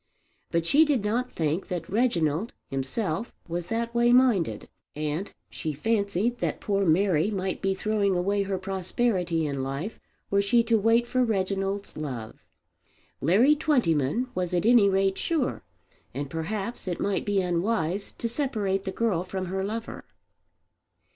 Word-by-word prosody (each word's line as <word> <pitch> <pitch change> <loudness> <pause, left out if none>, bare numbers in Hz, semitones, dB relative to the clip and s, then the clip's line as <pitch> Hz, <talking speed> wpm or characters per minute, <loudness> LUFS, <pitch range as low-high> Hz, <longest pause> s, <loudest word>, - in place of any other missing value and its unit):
But 170 -1 0
she 290 - +6
did 280 -9 +1
not 245 +4 0
think 160 +3 -1
that 175 -3 -4
Reginald 190 - +1 0.2
himself 155 - -2
was 170 0 -3
that 230 +1 -2
way 240 0 +4
minded, 230 - +3 0.3
and 155 +5 -3 0.2
she 155 - -4
fancied 210 - 0
that - - -1
poor 200 -3 0
Mary 175 +1 +3
might 190 -2 -2
be 195 -1 +1
throwing 205 -1 +1
away 200 +3 +1
her 195 -1 -1
prosperity 185 -2 -1
in 140 -2 -2
life 140 +10 -4 0.3
were 200 0 +4
she 235 +4 +3
to 230 -1 +2
wait 225 +3 +3
for 255 +1 +1
Reginald's 195 -2 -1
love. 125 -8 -6 0.8
Larry 220 - +5
Twentyman 240 - +1
was 180 -1 -1
at 175 - +1
any 230 -4 +6
rate 195 0 +1
sure; 315 -6 -1 0.5
and 140 0 -4
perhaps 195 +7 -3
it 175 - -2
might 200 - 0
be 205 -1 +1
unwise 180 +1 -1
to 235 - -3
separate 215 -7 -1
the 190 - -2
girl 190 -4 0
from 185 0 -4
her 190 0 -1
lover. 225 +3 -5
195 Hz, 150 wpm, -27 LUFS, 170-230 Hz, 0.8 s, she